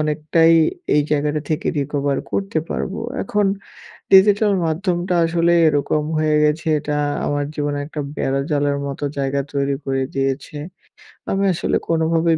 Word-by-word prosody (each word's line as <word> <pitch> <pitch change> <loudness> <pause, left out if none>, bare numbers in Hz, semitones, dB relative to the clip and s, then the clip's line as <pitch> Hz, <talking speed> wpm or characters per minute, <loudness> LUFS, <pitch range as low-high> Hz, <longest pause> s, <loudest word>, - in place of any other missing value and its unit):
অনেকটাই 155 +2 +3 0.4
এই 150 - +4
জায়গাটা 150 0 0
থেকে 155 - -1
রিকভার 140 0 -1
করতে 195 -5 -1
পারব। 190 - -3 0.3
এখন 205 +1 0 0.7
ডিজিটাল 205 +2 +6
মাধ্যমটা 175 +2 -1
আসলে 170 +1 +2 0.2
এরকম 150 0 +1
হয়ে 155 -1 +2
গেছে 150 +1 +1
এটা 150 0 -3 0.3
আমার 145 0 -1
জীবনে 145 -1 -2
একটা 150 0 -5 0.2
বেড়াজালের 140 +1 0
মতো 140 +1 -6
জায়গা 140 0 0
তৈরি 140 0 0
করে 135 -1 0
দিয়েছে। 135 +2 -2 0.7
আমি 195 +1 0
আসলে - - 0
কোনোভাবেই 165 0 +2
150 Hz, 130 wpm, -20 LUFS, 145-165 Hz, 0.7 s, ডিজিটাল